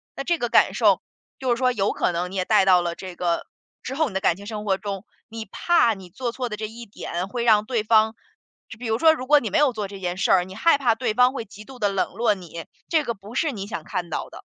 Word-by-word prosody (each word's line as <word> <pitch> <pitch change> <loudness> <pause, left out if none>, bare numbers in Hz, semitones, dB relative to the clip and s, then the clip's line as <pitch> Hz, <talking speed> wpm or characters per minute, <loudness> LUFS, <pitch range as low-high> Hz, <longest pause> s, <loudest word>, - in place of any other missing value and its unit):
那 275 - -4
这 345 +2 0
个 240 - -1
感 - - +4
受， - - +3 0.4
就 260 -3 -1
是 - - +3
说 255 -1 +3
有 200 -4 0
可 - - 0
能 175 +2 -3
你 - - -7
也 185 -1 0
带 210 -3 +4
到 180 -2 +5
了 170 -1 -3
这 185 -2 -8
个 175 -1 -1 0.4
之 260 - -5
后 310 +2 +1
你 200 - -9
的 190 - +1
感 170 - +3
情 200 - -11
生 210 -1 -5
活 195 -2 +2
中， 200 0 -5 0.2
你 225 -1 -6
怕 240 - +2
你 190 -3 -11
做 240 +5 -4
错 250 -1 -4
的 215 - -5
这 215 - -4
一 230 +1 -9
点 185 -2 -5
会 235 +4 -3
让 215 -3 +4
对 230 -2 -1
方 220 0 +3 0.6
比 245 - -5
如 225 - +1
说 320 +5 +6
如 255 -4 -6
果 295 0 +6
你 - - -4
没 320 - +2
有 290 -3 +4
做 210 -3 -3
这 195 0 -10
件 180 -1 -3
事 - - +1
儿， 180 -2 +5
你 190 - -11
害 290 +8 +4
怕 235 -4 +2
对 225 -2 -1
方 250 +2 +5
会 230 -5 -5
极 210 +1 -13
度 260 +4 -12
地 205 - +2
冷 195 -3 -1
落 225 +1 +2
你， 170 -4 -9 0.2
这 320 -2 +2
个 235 - -2
不 210 +2 -13
是 315 -4 +1
你 200 -4 -6
想 185 -7 -5
看 175 +2 -4
到 - - -4
的， - - -12
215 Hz, 305 characters per minute, -23 LUFS, 190-245 Hz, 0.6 s, 说